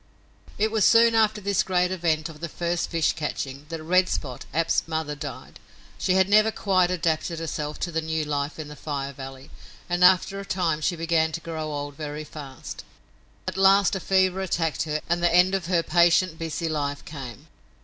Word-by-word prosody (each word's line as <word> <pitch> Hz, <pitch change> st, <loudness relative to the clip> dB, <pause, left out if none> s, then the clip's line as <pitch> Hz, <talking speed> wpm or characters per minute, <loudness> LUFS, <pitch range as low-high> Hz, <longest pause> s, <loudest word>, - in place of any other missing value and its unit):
It 215 Hz, +1 st, +1 dB
was 220 Hz, -2 st, +2 dB
soon 230 Hz, +2 st, +6 dB
after 220 Hz, -1 st, +3 dB
this 200 Hz, -1 st, +1 dB
great 180 Hz, -1 st, +1 dB
event 165 Hz, -4 st, 0 dB
of 155 Hz, -2 st, -11 dB
the 170 Hz, +1 st, -5 dB
first 170 Hz, +2 st, -2 dB
fish 165 Hz, -3 st, +1 dB
catching 145 Hz, -2 st, -5 dB
that 165 Hz, -1 st, -5 dB
Red 185 Hz, +3 st, +3 dB
Spot, 130 Hz, -5 st, -4 dB
Ab's 165 Hz, +3 st, +1 dB
mother, 160 Hz, -2 st, -2 dB
died. 145 Hz, -3 st, -8 dB, 0.4 s
She 185 Hz, -, +1 dB
had 190 Hz, 0 st, +4 dB
never 215 Hz, +2 st, +5 dB
quite 185 Hz, -4 st, +1 dB
adapted 165 Hz, -1 st, -1 dB
herself 150 Hz, -2 st, -4 dB
to 175 Hz, -, -2 dB
the 160 Hz, 0 st, -1 dB
new 160 Hz, -1 st, -2 dB
life 145 Hz, 0 st, -2 dB
in 155 Hz, -2 st, -6 dB
the 150 Hz, -, -9 dB
Fire 140 Hz, -2 st, -4 dB
Valley, 135 Hz, 0 st, -10 dB, 0.4 s
and 175 Hz, 0 st, 0 dB
after 190 Hz, +2 st, +5 dB
a -, -, -5 dB
time 175 Hz, -5 st, -1 dB
she 175 Hz, +3 st, 0 dB
began 165 Hz, -1 st, +1 dB
to 165 Hz, -, -3 dB
grow 160 Hz, -2 st, -5 dB
old 145 Hz, -1 st, -5 dB
very 150 Hz, 0 st, -5 dB
fast. 140 Hz, -4 st, -9 dB, 0.6 s
At -, -, -3 dB
last 195 Hz, +1 st, +5 dB
a -, -, -2 dB
fever 190 Hz, 0 st, +2 dB
attacked 165 Hz, -5 st, -1 dB
her 155 Hz, 0 st, -2 dB
and 170 Hz, +1 st, 0 dB
the 175 Hz, -, +3 dB
end 180 Hz, +2 st, +5 dB
of 190 Hz, -4 st, -1 dB
her 175 Hz, -2 st, +2 dB
patient, 175 Hz, 0 st, +3 dB
busy 165 Hz, 0 st, -3 dB
life 145 Hz, -2 st, -3 dB
came. 130 Hz, -7 st, -9 dB
165 Hz, 195 wpm, -25 LUFS, 150-185 Hz, 0.6 s, soon